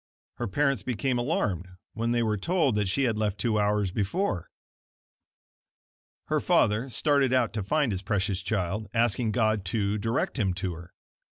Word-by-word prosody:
Her - - -2
parents 140 +5 +1
became 125 +1 -1
alarmed 105 - -1 0.3
when 115 +1 -1
they 120 0 +2
were 110 -1 +1
told 155 - +1
that 105 -1 +1
she 135 +9 +1
had 115 -4 +1
left 105 -2 0
two 110 +1 +1
hours 105 -2 +1
before. 100 - -1 1.8
Her - - +1
father 110 +6 +2
started 140 0 +2
out 125 -4 +2
to 110 - -2
find 145 +4 +1
his 95 -2 -2
precious 95 -1 -1
child, 95 +1 -2
asking 115 0 +2
God 110 -2 +1
to 100 +2 0
direct 115 +4 -1
him 95 -4 +1
to 90 0 -3
her. 85 +1 -11
110 Hz, 165 wpm, -27 LUFS, 100-125 Hz, 1.8 s, they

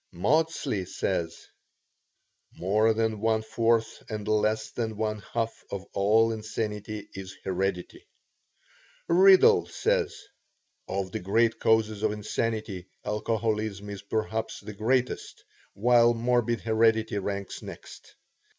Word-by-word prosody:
Maudsley 140 - +1
says: 85 -2 -3 1.1
"More 105 +5 +2
than 110 -1 0
one 110 0 +1
fourth 115 0 0
and 105 -2 -5
less 110 0 +1
than 110 -2 -3
one 110 -1 -1
half 115 -1 -2
of 100 -1 -5
all 110 +3 +3
insanity 110 -1 -4
is 95 0 -8
heredity." 95 -1 -3 1.0
Riddell 190 +2 +6
says: - - -1 0.6
"Of 95 0 -3
the - - -3
great 110 +5 +2
causes 110 -2 +2
of 110 -1 +1
insanity, 105 -2 -3 0.2
alcoholism 105 -1 -2
is 100 - -7
perhaps 110 +1 -3
the 105 - -8
greatest, 125 +5 -1 0.3
while 120 +2 +4
morbid 120 0 +1
heredity 110 -1 +2
ranks 100 0 -4
next. - - -11
110 Hz, 110 wpm, -27 LUFS, 100-115 Hz, 1.1 s, Riddell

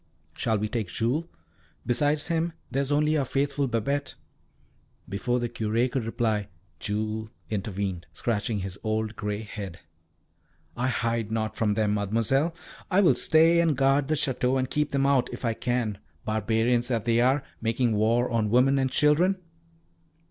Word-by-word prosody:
"Shall 110 -1 0
we 105 +1 -1
take 110 -2 -2
Jules? 120 - -1 0.6
Besides 145 +4 +1
him, 165 0 -1 0.2
there 135 - +1
is 140 +1 -1
only 150 +1 +3
our 140 - +2
faithful 140 +1 0
Babette." 135 +4 -1 0.9
Before 120 +5 -1
the 120 - -1
Curé 115 +2 0
could 125 -3 -1
reply 110 -3 0 0.3
Jules 110 +1 -2 0.2
intervened, 100 -3 -3
scratching 110 -2 -1
his 95 +1 -6
old 110 0 -1
grey 105 0 -3
head. 100 -5 -7 1.0
"I 125 +1 0
hide 115 -3 -1
not 110 -1 -1
from 105 -2 +1
them, 105 -1 +1
Mademoiselle; 115 - +1 0.3
I 190 +2 +4
will 180 - +6
stay 165 +2 +4
and 160 -5 +1
guard 135 +1 +3
the 155 - +1
Château 130 -2 +1
and 130 0 -1
keep 150 0 +1
them 135 -1 +1
out, 140 -3 +3
if - - -6
I 115 - +1
can, 115 -4 -1 0.3
barbarians 115 +3 +1
that 115 -4 -1
they 115 0 +3
are, 130 +3 +3 0.2
making 115 +1 +1
war 115 +4 +2
on 110 -2 0
women 130 +4 +4
and 130 0 +1
children." 155 +8 +3
120 Hz, 160 wpm, -27 LUFS, 110-140 Hz, 1.0 s, will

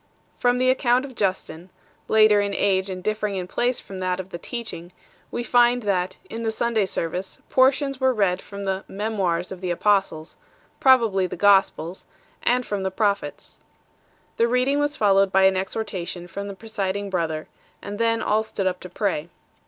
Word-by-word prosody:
From 245 0 +2
the 255 0 +4
account 255 0 +2
of 270 - -10
Justin 185 -5 -3 0.4
1, - - -1
later 215 -1 +6
in 200 -1 -2
age 195 -1 +1
and 185 -1 -6
differing 215 -1 -1
in 185 -1 -3
place 245 +5 0
from 190 -1 -9
that 185 0 -1
of 190 0 -6
the 170 - -6
Teaching, 180 -8 -6 0.4
we 240 - -3
find 245 0 +3
that, 185 -3 -1
in 230 - -6
the 225 - 0
Sunday 220 -2 0
service, 180 +2 -4
jmrtipns 270 +1 +3
were 260 -1 +3
read 195 -6 +1
from 200 0 -8
the 195 0 -2
" - - -38
Memoirs 195 -4 -2
of 190 -1 -7
the 185 - -3
Apostles 180 -3 0 0.2
" - - -35
probably 225 -8 +5
the - - -6
""Gospels 190 -2 +2 0.3
and 250 +1 +2
from 205 -2 -3
the 190 - -1
Prophets. 200 -6 -2 0.8
The 230 - +3
reading 250 +4 +2
was 290 +1 0
followed 195 -2 +4
by 190 0 +4
an 190 0 +5
exhortation 185 -2 -4
from 200 +4 -6
the 200 - -7
presiding 200 -2 -3
brother, 160 -4 -2 0.3
and 205 +1 -7
then 230 -1 +1
all 215 +1 +2
stood 205 -3 -4
up 180 -1 0
to 180 - -9
pray. 175 -4 -2
200 Hz, 185 wpm, -23 LUFS, 185-230 Hz, 0.8 s, later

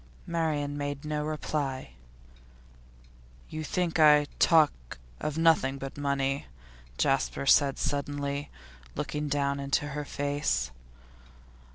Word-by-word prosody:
Marian 150 -4 -1
made 145 0 -4
no 150 0 -1
reply. 150 -3 -3 1.6
'You 155 0 -5
think 175 0 -1
I 150 -1 +7
talk 150 - +3 0.2
of 150 0 -3
nothing 160 -5 +3
but 135 0 -7
money?' 140 -1 -1 0.5
Jasper 135 0 +1
said 140 0 +5
suddenly, 145 0 -2 0.5
looking 150 0 -3
down 140 -1 0
into 140 +1 0
her 150 +1 -4
face. 145 - -1
145 Hz, 100 wpm, -29 LUFS, 140-150 Hz, 1.6 s, I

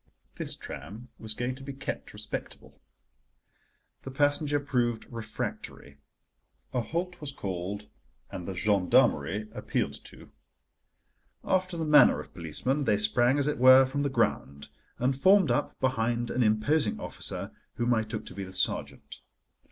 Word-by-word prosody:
This - - -5
tram 105 - -9
was 110 -1 -4
going 125 +2 -2
to 130 - -12
be 140 0 -6
kept 135 - -5
respectable. - - -8 1.2
The - - -7
passenger 145 +2 +1
proved 120 -5 -1
refractory, 105 -10 -6 0.7
a 125 - +1
halt 175 +8 -4
was 145 -2 -5
called, 100 -2 -5 0.4
and 90 - -6
the 95 - -4
gendarmerie 100 +1 +2
appealed - - -3
to. - - -12 1.1
After 185 -2 0
the 160 - -2
manner 150 -1 +6
of - - -10
policemen, 130 - -1
they 105 - +3
sprang, 120 +5 +3
as 140 0 +1
it 150 - -1
were, 130 +1 +8
from 140 +2 -2
the 140 - 0
ground, 70 - -1 0.3
and 130 +2 +1
formed 185 +1 +5
up 120 - -1
behind 120 -2 0
an 125 - 0
imposing 110 +3 +2
officer, - - -5 0.2
whom 120 +1 +1
I 110 - +2
took 110 -1 -5
to - - -9
be 100 +1 -5
the 95 0 -9
sergeant. - - -3
120 Hz, 145 wpm, -28 LUFS, 105-140 Hz, 1.2 s, were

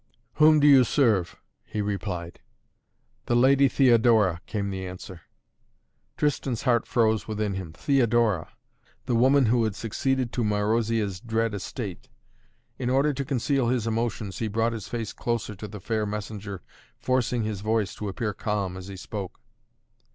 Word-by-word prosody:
"Whom 155 0 +6
do 145 - +3
you 140 -3 +8
serve?" 110 - +2 0.3
he 105 - -6
replied. 100 -4 -4 0.9
"The 120 - +2
Lady 135 +3 +5
Theodora!" 115 -9 +4
came 100 -2 -2
the 95 -1 -4
answer. 90 -1 -9 1.0
Tristan's 135 -5 -1
heart 120 -4 +2
froze 110 -3 +1
within 105 -2 -2
him. 95 -4 -5
Theodora 115 - +1 0.6
the 125 - -1
woman 130 +3 +4
who 115 +1 +3
had 110 -3 -1
succeeded 125 +3 -1
to 120 - -1
Marozia's 105 -1 0
dread 115 0 -1
estate! 100 0 -6 0.7
In 125 - -1
order 140 +3 +2
to 140 +1 -3
conceal 135 -1 0
his 120 -2 0
emotions 115 -3 -2
he 115 - -1
brought 115 +2 0
his 110 -3 -6
face 115 -3 -4
closer 115 -2 -2
to 105 +2 -8
the 105 0 -9
fair 110 +2 -2
messenger, 105 -2 -6 0.3
forcing 125 -2 0
his 105 -3 -3
voice 110 -1 0
to 105 - -6
appear 105 +2 -3
calm 100 -3 -2
as 95 0 -9
he 100 -1 -8
spoke. 95 0 -7
110 Hz, 150 wpm, -26 LUFS, 100-120 Hz, 1.0 s, you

